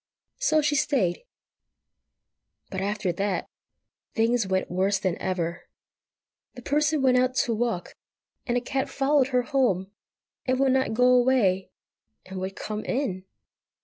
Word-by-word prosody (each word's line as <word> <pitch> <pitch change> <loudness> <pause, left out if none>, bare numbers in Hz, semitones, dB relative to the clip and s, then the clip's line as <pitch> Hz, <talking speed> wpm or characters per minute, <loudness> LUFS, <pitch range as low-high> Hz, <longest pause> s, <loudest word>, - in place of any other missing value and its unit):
So 310 -11 +2
she 295 - +2
stayed. 260 - +1 1.5
But 190 -1 -3
after 200 -2 -1
that, 195 0 -2 0.7
things 225 -1 +2
went 190 -1 -1
worse 190 +2 +1
than 185 -3 -1
ever. 175 -3 -3 0.9
The 245 - -10
Person 295 +1 +1
went 255 -1 +4
out 255 0 +2
to 235 - -1
walk, 225 -5 -2 0.5
and 245 -1 +1
a - - 0
cat 265 +2 -2
followed 275 -1 +2
her 250 -2 +1
home, 240 - 0 0.6
and 255 0 +1
would 270 -1 +3
not 260 -4 +1
go 250 +2 +4
away, 240 -7 +3 0.6
and 190 0 -7
would 190 +1 -4
come 215 0 -5
in! 195 -9 -2
235 Hz, 140 wpm, -26 LUFS, 190-265 Hz, 1.5 s, went